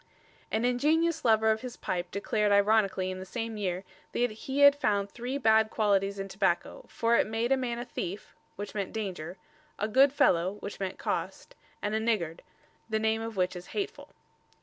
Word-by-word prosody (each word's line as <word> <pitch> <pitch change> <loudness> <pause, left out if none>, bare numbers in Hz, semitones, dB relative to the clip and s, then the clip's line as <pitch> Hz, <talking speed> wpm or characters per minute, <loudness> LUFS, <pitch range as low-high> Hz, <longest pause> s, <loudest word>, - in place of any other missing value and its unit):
_ - - -30 0.5
An 220 +2 0
ingenious 310 +6 +2
lover 220 -1 +4
of 220 0 -1
his 250 -1 -7
pipe 175 -1 -3
declared 205 +2 0
ironically 200 -2 +3
in 185 - -6
the - - -6
same 225 +3 -4
year 185 -3 -2 0.3
that 245 -1 +1
he 270 +6 -3
had 285 0 +9
found 200 -7 0
three 245 +3 -4
bad 220 -4 +4
qualities 200 -2 +1
in 195 0 -4
tobacco, 190 -2 -1
for 230 0 +2
it - - +2
made 225 +3 -1
a - - +6
man 250 -3 -2
a 240 - -4
thief 195 -4 -6 0.2
(which 205 0 -6
meant 200 -3 -3
danger), 185 -5 -4 0.4
a 210 - -1
good 265 +5 +5
fellow 180 -8 +3
(which 200 - -7
meant 190 -1 -3
cost), - - -4 0.3
and 210 - -1
a 220 - +1
niggard 210 -8 -1 0.5
("the 220 - +1
name 220 0 +1
of 225 -2 -6
which 185 0 +1
is 180 +1 -8
hateful"). 410 +2 -4
220 Hz, 195 wpm, -29 LUFS, 195-240 Hz, 0.5 s, had